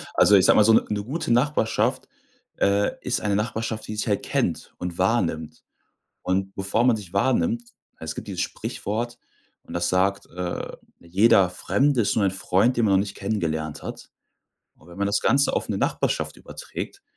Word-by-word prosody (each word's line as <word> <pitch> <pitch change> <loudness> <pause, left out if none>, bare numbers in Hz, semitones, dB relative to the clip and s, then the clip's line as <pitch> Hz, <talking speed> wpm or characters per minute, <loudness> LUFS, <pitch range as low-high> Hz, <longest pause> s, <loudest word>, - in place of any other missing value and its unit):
Also, 105 - +6
ich 95 -2 +5
sage - - +6
mal, 105 - +7
so 110 - +6
'ne - - +5
'ne 105 -1 -2
gute 135 +3 -3
Nachbarschaft, 120 -2 +1 0.5
äh, 100 +1 +2
ist 125 - -1
eine 105 -1 0
Nachbarschaft, 110 +1 -3
die 110 - -5
sich 105 - -3
halt 100 -2 0
kennt - - -2
und 90 -1 -5
wahrnimmt. 85 -6 0 0.6
Und 95 +1 -1
bevor 100 +4 0
man 125 -3 +4
sich 95 -5 -10
wahrnimmt 230 - +1 0.4
es 80 0 -5
gibt - - -8
dieses - - -2
Sprichwort 120 +3 -4 0.4
und - - -13
das 85 0 0
sagt: 95 +2 +1
„Äh, 90 0 -5 0.2
jeder 95 +2 +4
Fremde 130 +7 +1
ist - - 0
nur 105 - +2
ein - - +2
Freund, 95 +5 +1
den 120 - +2
man 100 - +3
noch - - +5
nicht 100 0 -2
kennengelernt 80 -7 -3
hat.“ - - -8 0.7
Und 80 - -20
wenn 85 - -12
man 100 - +1
das 100 +1 +1
Ganze 140 +1 +3
auf - - -2
'ne - - -1
Nachbarschaft - - -1
überträgt, 395 - -8
100 Hz, 185 wpm, -24 LUFS, 95-115 Hz, 0.7 s, mal